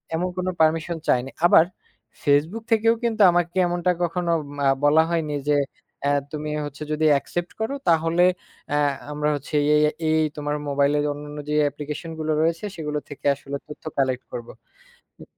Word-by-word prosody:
এমন 180 +2 -1
কোন 185 - -2
পারমিশন 165 +1 +2
চায়নি। 125 +1 +2 0.2
আবার, 170 -1 +7 0.6
Facebook 155 +10 +2
থেকেও 225 +1 +4
কিন্তু 225 -2 0
আমাকে 175 0 0
এমনটা 175 +1 +1
কখনো 170 0 -1
উম 145 0 -11
আ - - +6
বলা 155 +2 +5
হয়নি 160 -3 -1
যে, 145 - +4 0.5
এ - - +3 0.2
"তুমি 150 0 -4 0.2
হচ্ছো 145 +1 -7
যদি 155 +1 +1
অ্যাকসেপ্ট 170 +5 -2
করো, 225 +5 -1 0.2
তাহলে 165 +2 +3 0.5
এ - - +2 0.3
আমরা 150 0 0
হচ্ছি 145 +2 -9
এ - - +5 0.2
এই, 150 - +4
এ 160 0 -3
এই 155 0 +3
তোমার 145 0 -2
মোবাইলের 145 +1 +2
অন্যান্য 145 0 -9
যে - - 0
অ্যাপ্লিকেশন 150 +3 -4
গুলো 155 0 -1
রয়েছে, 165 +5 0
সেগুলো 150 -2 -3
থেকে 145 - -11
আসলে 140 0 -6
তথ্য 150 - -11
কালেক্ট 130 -2 0
করব।" 120 - -6 0.8
উ - - -9
155 Hz, 170 wpm, -23 LUFS, 145-170 Hz, 0.8 s, আবার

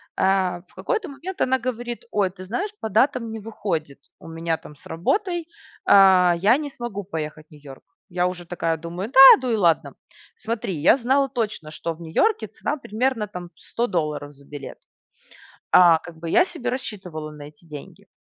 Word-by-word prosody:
А 185 -2 +1
в - - -27
какой-то 435 -8 -2
момент 355 +7 -7
она 260 0 +2
говорит: 240 -1 -5
"Ой, 200 -3 +1
ты 185 -1 -11
знаешь, 385 - -3
по 220 - -3
датам 230 +1 +1
не 225 - -6
выходит 185 -10 -4 0.2
у - - -13
меня 165 0 -2
там 150 - -14
с - - -24
работой, 345 - -1 0.4
а, 190 -2 +6
я 215 +8 +4
не 295 -2 -5
смогу 240 -6 -6
поехать 155 -4 -6
в - - -42
New 150 - -14
York". 135 -2 -12 0.3
Я 180 0 0
уже 180 -1 -6
такая 165 -2 -2
думаю: 175 +8 -6
"Да, 265 - +4 0.2
ду 255 - -2
и - - +2
ладно, 170 -8 +2
м". - - -21 0.4
Смотри, 220 -4 -3
я 175 - +6
знала 270 +2 +1
точно, 220 - -3
что 165 +2 -4
в 160 - -16
Нью-Йорке 405 - +1
цена 295 - -4
примерно 225 -2 -1
там 180 -3 -9
100 235 - -3
долларов 150 -7 -3
за 140 0 -20
билет. 145 -2 -9 0.9
А 170 -3 +7
как 170 0 -12
бы, 165 +1 -6
я 355 - +5
себе 335 -10 -5
рассчитывала 185 -11 -6
на 150 -1 -11
эти 150 +3 -14
деньги. 150 -3 -11
190 Hz, 190 wpm, -23 LUFS, 165-245 Hz, 0.9 s, А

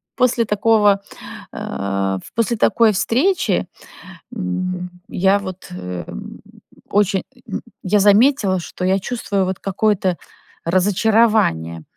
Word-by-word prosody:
после 245 -2 +2
такого, 210 -1 +3 0.6
э, - - -10 0.7
в - - -14
после 230 0 0
такой 225 0 +4
встречи, 270 - +1 0.7
м, 185 -2 -3 0.2
я 195 +2 +3
вот, 185 -2 -8
э, 90 -1 -6
м, - - -9 0.5
очень, 200 -1 +2 0.3
м, - - -3 0.2
я 205 +2 +2
заметила, 205 -1 +4
что 180 - -7
я 190 +1 +2
чувствую 200 -2 -2
вот 185 0 -3
какое-то 195 -2 0 0.5
разочарование, 185 - +2
195 Hz, 110 wpm, -19 LUFS, 185-220 Hz, 0.7 s, такой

